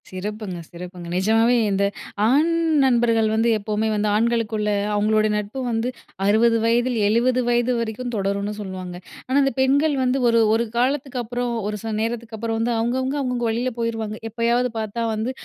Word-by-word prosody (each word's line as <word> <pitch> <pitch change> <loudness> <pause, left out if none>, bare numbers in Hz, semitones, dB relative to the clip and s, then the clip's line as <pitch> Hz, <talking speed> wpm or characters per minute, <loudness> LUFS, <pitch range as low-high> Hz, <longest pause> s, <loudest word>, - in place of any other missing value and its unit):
சிறப்புங்க, 195 -1 -5
சிறப்புங்க. 175 0 -9
நிஜமாவே 225 +5 +3 0.2
இந்த 195 0 +1 0.4
ஆண் 295 +7 +3 0.3
நண்பர்கள் 235 -3 +3
வந்து 225 +2 +2
எப்பவுமே 215 +1 -2
வந்து, 210 0 0
ஆண்களுக்குள்ள 220 -1 0 0.2
அவுங்களோட 215 +1 +2
நட்பு 210 +5 -4
வந்து 225 +2 0 0.4
60 230 +3 +4
வயதில் 240 +1 +2
70 245 +4 +2
வயது 240 +1 +2
வரைக்கும் 235 +2 -4
தொடரும்ன்னு 200 +1 -1
சொல்லுவாங்க. 185 -2 -6 0.3
ஆனா, 260 - -1
அந்த 275 - +2
பெண்கள் 285 +3 +3
வந்து 255 +1 +1
ஒரு 230 0 +4
ஒரு 230 +1 +2
காலத்துக்கப்புறம், 245 -2 -1
ஒரு 210 - -2
சில 225 - -3
நேரத்துக்கப்புறம் 225 -1 -3
வந்து 235 +1 0
அவுங்கவுங்க 240 +3 0 0.2
அவங்கவங்க 250 -3 -1
வழியில 235 +3 0
போயிருவாங்க. 225 -2 -2
எப்பயாவது 235 +2 +1
பார்த்தா 220 +2 -3
வந்து, 220 +4 -2
230 Hz, 150 wpm, -22 LUFS, 210-245 Hz, 0.4 s, 60